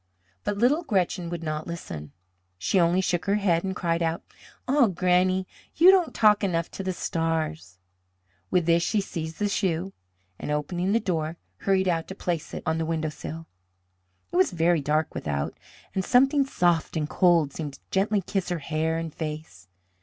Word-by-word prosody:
But 205 - -2
little 270 +10 +3
Gretchen 185 - 0
would 170 -1 -5
not 155 0 -3
listen. 80 - -7 0.5
She 95 - +1
only 175 +2 +3
shook 180 -2 -1
her 200 0 +2
head 180 -5 +2
and 190 -1 -2
cried 170 -1 0
out: 165 0 -1 0.4
"Ah, 270 -2 +4
Granny, 185 0 +2 0.3
you 355 +4 +8
don't 370 -4 +3
talk 210 -1 +5
enough 170 -4 0
to - - -6
the 190 - -1
stars." 160 - -2 0.7
With 175 - +2
this 170 0 +4
she 210 +4 +1
seized 165 -4 -5
the 210 - 0
shoe, 190 -2 -1 0.5
and, - - -5
opening 175 +6 -1
the 230 - +4
door, 165 -5 -2 0.2
hurried 190 -1 +1
out 165 -2 0
to 190 - -7
place 170 -5 -3
it - - -6
on 160 -1 0
the 165 - -1
windowsill. 160 0 -4 0.9
It - - -1
was 185 0 +3
very 170 -1 +2
dark 155 +2 0
without, 70 -1 -3 0.4
and 190 - 0
something 270 +5 +4
soft 175 -9 +1
and 150 -1 -1
cold 165 -5 +3
seemed 150 -3 -5
to - - -18
gently 200 +1 +2
kiss 190 +1 -2
her 175 - -1
hair 160 +2 -1
and 165 -2 -4
face. 150 - -6
170 Hz, 175 wpm, -26 LUFS, 160-190 Hz, 0.9 s, you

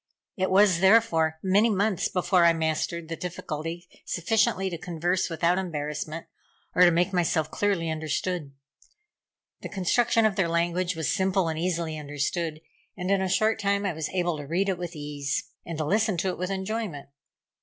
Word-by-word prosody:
It 190 0 0
was, 190 -2 +5
therefore, 170 -6 +4
many 200 +4 +4
months 205 -2 +1
before 180 -1 +2
I 170 0 +6
mastered 160 +1 -2
the 165 - -4
difficulty 170 0 -5 0.2
sufficiently 195 +1 +1
to 170 - -4
converse 175 +3 -1
without 170 +2 +1
embarrassment, 155 -2 -4 0.5
or - - +2
to 180 - +9
make 175 +3 +1
myself 165 -3 +1
clearly 195 -5 0
understood. 160 0 -2 1.1
The - - -6
construction 225 +4 +2
of 215 -2 +1
their 180 -4 +2
language 175 +2 0
was 160 -2 -1
simple 190 -3 +1
and 160 0 -3
easily 165 -3 -2
understood, 150 +2 -3 0.4
and 180 0 -2
in 195 -1 +3
a 190 - -1
short 215 +4 +2
time 200 -1 0
I 190 - 0
was 155 -1 -4
able 175 -3 -1
to 145 -1 -7
read 185 +6 0
it 185 -2 -1
with 175 -1 -5
ease, 145 -1 -3 0.2
and 165 -2 -4
to 155 - -1
listen 210 +3 +1
to 190 +3 0
it 180 - -4
with 185 +1 -2
enjoyment. 195 -6 -4
175 Hz, 175 wpm, -26 LUFS, 160-190 Hz, 1.1 s, to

